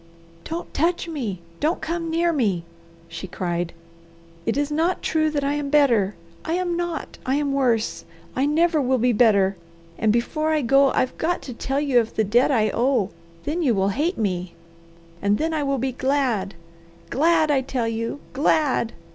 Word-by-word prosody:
"Don't 335 +2 -5
touch 340 +3 0
me! 235 - -4 0.2
Don't 315 +4 +1
come 335 0 -3
near 335 +1 +1
me!" 205 - 0 0.4
she 165 +3 -7
cried. 175 -2 -2 0.8
"It - - +1
is 290 +1 0
not 330 +5 0
true 310 -1 +1
that 290 -2 -1
I 280 +1 +1
am 290 -1 -2
better. 235 -9 +3 0.3
I 320 - -2
am 355 -1 0
not! 345 -2 -4
I 260 - 0
am 285 -1 0
worse! 240 -5 +1 0.3
I 265 +2 +2
never 320 +1 +3
will 260 0 +2
be 245 +1 +2
better. 200 -4 +4 0.4
And 220 - +3
before 305 +7 0
I 310 -2 +1
go 275 +3 +5
I've 255 - 0
got 345 +2 0
to 255 - -7
tell 270 +4 -2
you 275 -4 +3
of 230 -1 -2
the 220 - +2
debt 235 +5 +3
I 220 -6 +2
owe; 240 -5 +1 0.3
then 320 +4 -2
you 255 -8 +2
will 195 0 +2
hate 305 - -1
me, 180 -5 -2 0.7
and 200 +1 +2
then 320 +5 -1
I 310 - 0
will 275 -1 0
be 260 +1 -1
glad! 255 -8 0 0.6
Glad, 315 +2 +3
I 275 -2 +3
tell 255 -3 -2
you! 230 +4 -3
Glad! 275 -4 +1
270 Hz, 180 wpm, -23 LUFS, 225-310 Hz, 0.8 s, go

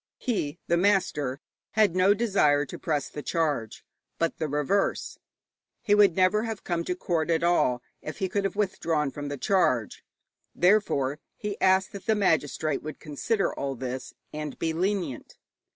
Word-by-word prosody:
He, 175 - -2
the 170 - +2
master, 160 -8 +1 0.3
had 210 -5 +3
no 190 +2 +5
desire 190 -10 +3
to 130 - -9
press 150 -6 -1
the 150 - -7
charge, 145 -9 -2 0.3
but 165 -1 -1
the 160 - -1
reverse. 150 +7 0 0.6
He 215 -3 +3
would 205 -5 +5
never 185 +3 +3
have 225 -2 -4
come 170 -2 -1
to 180 - -1
court 170 -3 -1
at 165 0 +2
all 125 -8 +2 0.2
if 155 - -7
he 190 - -1
could 200 +2 -1
have 195 -1 -2
withdrawn 165 -8 0
from 145 0 -6
the 145 0 -4
charge. 130 - +1 0.5
Therefore 170 -8 +2 0.2
he 210 -1 -5
asked 190 0 +3
that 200 - -9
the 220 - +4
magistrate 160 -6 +1
would 155 0 -7
consider 195 +8 -1
all 135 -1 -3
this, 130 +1 -6 0.2
and 150 -2 -5
be 160 -1 -1
lenient. 175 - -2
170 Hz, 165 wpm, -27 LUFS, 145-195 Hz, 0.6 s, no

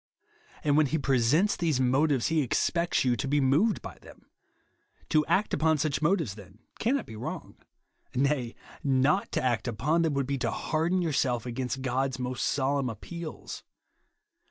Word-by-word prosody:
And 145 -1 +3
when 155 -2 +4
he 160 - 0
presents 140 - +2
these 160 -6 0
motives, 130 +1 +2
he 160 -1 +2
expects 170 +5 +1
you 125 -1 +3
to 135 - -3
be 145 +2 +2
moved 145 +12 +2
by - - -9
them. - - -16 0.8
To 155 -1 +4
act 205 +3 +1
upon 160 0 +2
such 150 -1 -1
motives, 160 - +1
then, 100 -1 -14 0.2
cannot 270 +5 0
be - - -10
v>^rong. 110 - -7 0.6
Nay, 130 -2 0 0.3
not 140 +7 +2
to - - 0
act 120 -3 0
upon 140 +9 +1
them, 160 -4 +1
would 140 -1 0
be 140 0 -2
to - - 0
harden 170 +3 0
yourself 130 -7 0
against 125 +2 -3
God's 130 0 -1
most 125 0 -2
solemn 135 -1 0
appeals. 160 - -7
140 Hz, 160 wpm, -28 LUFS, 125-160 Hz, 0.8 s, when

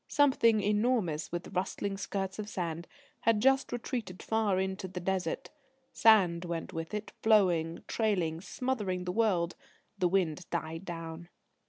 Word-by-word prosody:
Something 230 -7 +4
enormous, 205 -7 +1
with 175 0 -4
rustling 195 +2 -2
skirts 195 +1 -3
of 210 0 -4
sand, 170 -4 -3 0.3
had 225 -2 +3
just 270 +3 +3
retreated 230 -6 -4
far 215 -4 +1
into 190 0 -2
the 185 0 -6
Desert. 190 +8 -2 0.4
Sand 185 -6 +5
went 170 -2 -4
with 165 +4 -4
it 210 0 -5
flowing, 175 -7 +3
trailing, 180 -8 0
smothering 205 -5 -2
the 180 - -2
world. 180 -5 +1 0.4
The 180 - +3
wind 180 -2 0
died 165 +1 -3
down. 165 -1 -6
190 Hz, 140 wpm, -31 LUFS, 170-215 Hz, 0.4 s, Sand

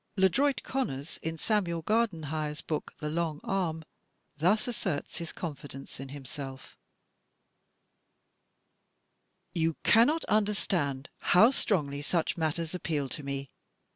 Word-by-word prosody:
LeDroit 260 +10 +3
Conners, 150 - -3
in 160 0 -3
Samuel 170 -5 0
Gardenhire's 160 -8 0
book, 155 - -3
"The 150 - -4
Long 160 -1 -1
Arm," 165 -5 -1 0.5
thus 180 +11 +3
asserts 185 -11 -2
his 170 -1 -4
confidence 145 -6 -7
in 135 0 -6
himself: 135 -1 -7 2.8
"You 165 -1 +1
cannot 270 +9 +5
understand 190 -10 +1
how 220 +8 +6
strongly 145 - 0
such 165 +3 +1
matters 160 0 -1
appeal 155 -6 -1
to 150 - -5
me. 140 -1 -4
160 Hz, 105 wpm, -30 LUFS, 145-195 Hz, 2.8 s, how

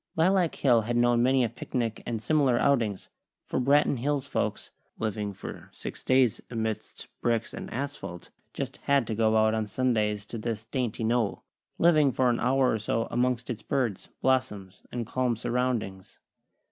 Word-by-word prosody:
Lilac 180 +1 +3
Hill 120 -5 +4
had 120 +2 -1
known 120 0 +4
many 130 +1 +4
a 115 - +1
picnic 115 0 -3
and 115 -2 -2
similar 140 -6 +3
outings; 115 -9 +1 0.4
for - - -1
Branton 140 0 +3
Hills 145 +2 0
folks, - - -2 0.3
living 105 -2 -2
for 100 - -9
six - - -8
days 130 -4 +3
amidst 110 -2 -4
bricks 115 -1 0
and - - -7
asphalt, 115 -10 -5 0.2
just - - -5
had 140 -3 +2
to 110 - -3
go 110 0 +3
out 110 0 +4
on 110 -1 -1
Sundays 105 -3 0
to 115 +2 -6
this 115 0 -4
dainty 120 -2 -2
knoll, 115 -2 0 0.3
living 155 -5 +5
for 125 -1 +2
an 120 - -1
hour 130 +1 +3
or 110 - 0
so 115 +2 -1
amongst 125 0 0
its 115 - -5
birds, 120 -8 -2
blossoms 105 -8 0
and 120 -1 -3
calm 125 +1 0
surroundings. 115 -5 -2
120 Hz, 165 wpm, -28 LUFS, 110-130 Hz, 0.4 s, living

